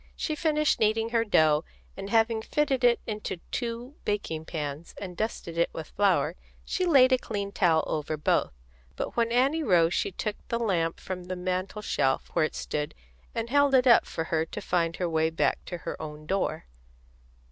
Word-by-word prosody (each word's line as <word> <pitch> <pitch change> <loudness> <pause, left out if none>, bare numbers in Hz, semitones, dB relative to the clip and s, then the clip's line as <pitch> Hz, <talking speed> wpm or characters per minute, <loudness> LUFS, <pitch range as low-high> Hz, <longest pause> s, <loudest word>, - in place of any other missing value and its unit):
She 310 - -2
finished 305 -1 +1
kneading 225 +1 +2
her 230 -1 +2
dough, 155 -7 +3 0.3
and 195 0 -6
having 225 0 +2
fitted 270 +1 0
it 240 -1 +5
into 210 -3 -4
two 240 +3 -4
baking 165 -6 -2
pans 150 -1 -5
and 185 -3 -7
dusted 170 -5 -3
it 170 - +3
with 160 - -7
flour, 180 -6 +2 0.3
she 365 -1 -1
laid 265 -6 +6
a 255 - +4
clean 200 -3 -4
towel 165 -6 +3
over 155 0 -2
both. 150 - +1 0.4
But - - -4
when 230 -1 +1
Annie 270 +7 +3
rose 175 - +3
she - - 0
took 210 +3 -3
the 235 - -1
lamp 175 -8 0
from 185 -1 -6
the 185 +1 -4
mantel 185 +3 -3
shelf, 135 -8 0
where 155 - +3
it - - -5
stood, 150 0 -3 0.4
and 230 +1 -3
held 285 -1 +4
it 255 0 +5
up 240 -2 +6
for 165 - -3
her 160 -1 0
to 165 - -7
find 170 -4 0
her 180 - -1
way 160 -1 +1
back 160 - 0
to 175 - -5
her 165 - -6
own 155 -1 -7
door. 190 - -1
195 Hz, 190 wpm, -28 LUFS, 165-235 Hz, 0.4 s, laid